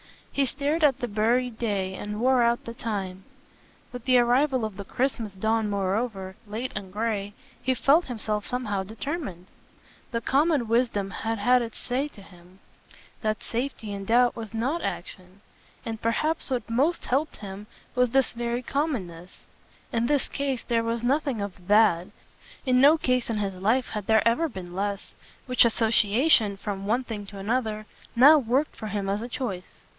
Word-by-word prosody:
He 280 - +1
stared 290 +5 -1
at 280 -4 +4
the 245 - -3
buried 230 +3 +1
day 200 -5 -1
and 210 +2 -5
wore 255 0 +4
out 235 0 +2
the 230 - -6
time; 195 -5 -4 0.7
with 245 -2 -8
the 255 -1 +5
arrival 250 +1 +3
of 215 -3 -6
the 200 - -6
Christmas 235 -3 -2
dawn 220 +2 0
moreover, 195 0 -2
late 225 +5 -4
and 195 -1 -6
grey, 210 -1 -2 0.3
he 260 - +1
felt 295 +7 +4
himself 215 -4 -2
somehow 225 -6 -2
determined. 220 - -5 0.6
The 230 -1 -2
common 285 -1 +2
wisdom 230 -4 +1
had 225 +4 -2
had 245 +5 +4
its 230 -2 -6
say 260 +4 -1
to 210 - -15
him 180 0 -18 0.6
that 215 -1 -1
safety 235 -3 -4
in 200 -1 -5
doubt 240 +3 +4
was 225 -1 -7
NOT 270 +10 0
action; 185 +2 -6 0.4
and 225 -1 -5
perhaps 305 +9 0
what 255 -2 -2
most 275 +9 +1
helped 285 +5 0
him 200 0 -8 0.3
was 250 -1 +3
this 270 +2 +2
very 240 +1 -2
commonness. 190 - -3 0.5
In 235 0 +1
his 290 -1 +1
case 275 -3 -2
there 235 -2 +1
was 230 0 -2
nothing 270 -3 +1
of 185 -3 -7
THAT 205 -5 +4 0.6
in 255 -1 +4
no 295 +4 +7
case 250 -5 0
in 225 - -1
his 200 -2 -1
life 225 +8 +1
had 210 -3 -5
there 220 -1 +4
ever 315 +8 +2
been 185 -6 -8
less: 200 +1 -3 0.3
which 250 -2 +4
association, 220 0 +3
from 200 -1 -5
one 240 +5 +1
thing 210 -4 -6
to 200 - -10
another, 215 +1 -1 0.3
now 290 +6 +8
worked 265 +4 0
for 215 - -6
him 205 -1 -2
as 200 +2 -1
a 240 - -5
choice. 195 -8 -5
230 Hz, 170 wpm, -26 LUFS, 205-255 Hz, 0.7 s, now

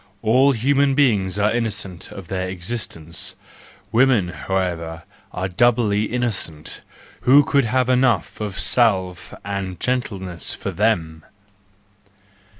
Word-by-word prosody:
All 130 +5 +4
human 135 +3 +2
beings 105 -9 +2
are 105 +1 +2
innocent 105 -6 -3
of 95 -3 -9
their 95 0 -3
existence, 90 -4 -5 0.6
women, 120 -6 +3
however, 85 -1 -3 0.3
are 95 +1 -3
doubly 110 +1 +2
innocent; 105 -10 -2 0.4
who 140 +3 +6
could 140 -2 +2
have 125 +2 +1
enough 125 -7 +1
of 105 -3 -4
salve 95 -7 +1
and 100 -2 -4
gentleness 95 -9 -2
for - - -5
them! 85 -8 0
105 Hz, 110 wpm, -21 LUFS, 90-120 Hz, 0.6 s, who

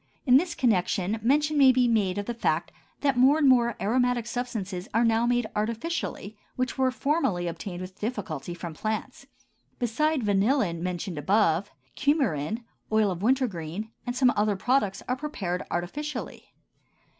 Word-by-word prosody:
In 255 -2 +7
this 340 +4 0
connection 200 -2 +1
mention 295 +5 +2
may 265 -2 +8
be 250 -1 +3
made 205 -5 +1
of 205 - -2
the 240 - -3
fact 235 - -1 0.3
that 275 -3 +2
more 270 +4 +6
and 300 -3 +3
more 240 -2 +4
aromatic 245 +1 +1
substances 220 -6 -4
are 230 - +4
now 230 +1 +2
made 245 -1 +2
artificially 225 - -3 0.2
which 255 0 -2
were 260 -1 +2
formerly 255 - 0
obtained 175 +2 -5
with 185 0 -9
difficulty 185 - -4
from 170 -1 -7
plants. 220 - -4 0.5
Besides 270 +4 0
vanillin 205 - +2
mentioned 180 -2 -3
above, 190 +2 +2 0.3
cumarin, 235 - 0 0.3
oil 215 -2 +3
of 175 -1 -5
wintergreen, 215 - -1 0.2
and 245 - -2
some 255 -1 +4
other 210 0 +2
products 210 -2 0
are 250 - 0
prepared 200 -12 -3
artificially. 255 +11 -4
225 Hz, 150 wpm, -27 LUFS, 190-255 Hz, 0.5 s, may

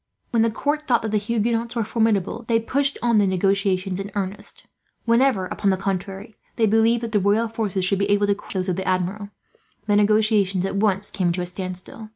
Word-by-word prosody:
When 230 - +2
the 230 - +3
court 295 +7 -2
thought 240 -3 +2
that 220 - -3
the 215 - +2
Huguenots 230 +2 -1
were 230 - 0
formidable, 220 0 0
they 230 -1 +3
pushed 275 +5 +1
on 235 -3 +3
the 200 - +3
negotiations 190 0 0
in 200 +1 -5
earnest. 200 +1 -5 0.4
Whenever, 235 -4 +3
upon 200 +2 -1
the 190 - +2
contrary, 195 +2 -4 0.2
they 225 - +2
believed 225 +2 +2
that 230 - -4
the 210 - +2
royal 205 +4 +2
forces 210 -5 -2
would 195 - +1
be 200 0 0
able 205 0 +3
to 205 - +2
crush 200 - -10
those 185 0 -1
of 180 - -1
the 190 - -4
Admiral, 185 +3 -1 0.6
the 205 -1 +2
negotiations 205 -3 +2
at 195 - -3
once 205 -1 +1
came 180 -3 0
to 180 - -3
a - - -2
standstill. 185 +4 -6
205 Hz, 210 wpm, -22 LUFS, 190-225 Hz, 0.6 s, the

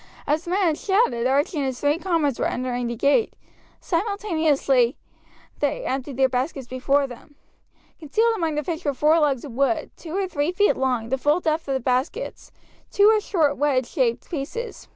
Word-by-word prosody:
As 305 +4 0
the - - -6
man 385 +3 +1
had 305 - -2
shouted, 380 - +1
Archie 285 +5 +1
and 275 - 0
his 260 -2 -4
three 290 +3 +1
comrades 330 -8 0
were - - +1
entering 245 -1 -2
the 235 - -3
gate. 285 - +2 0.4
Simultaneously 320 - +1 0.6
they - - -1
emptied 265 0 -3
their 265 0 +4
baskets 260 +2 -2
before 275 +3 +1
them. 270 +3 -12 0.6
Concealed 440 +9 +1
among 325 -6 -1
the 300 - -1
fish 335 +2 -4
were 285 -2 -1
four 305 +4 +4
logs 285 -4 +1
of 280 - -8
wood; 275 +6 0
two 325 -2 -9
were 390 0 0
three 295 -2 -1
feet 410 +3 +3
long, 250 -4 -1
the 265 +1 -1
full 295 +5 +2
depth 320 -2 -1
of 270 - 0
the - - 0
baskets, 260 - -2 0.4
two 405 +1 +5
were 435 -1 +4
short 315 -9 +1
wedge 275 -3 +1
shaped 245 -4 -1
pieces. 345 - -5
290 Hz, 190 wpm, -23 LUFS, 265-345 Hz, 0.6 s, two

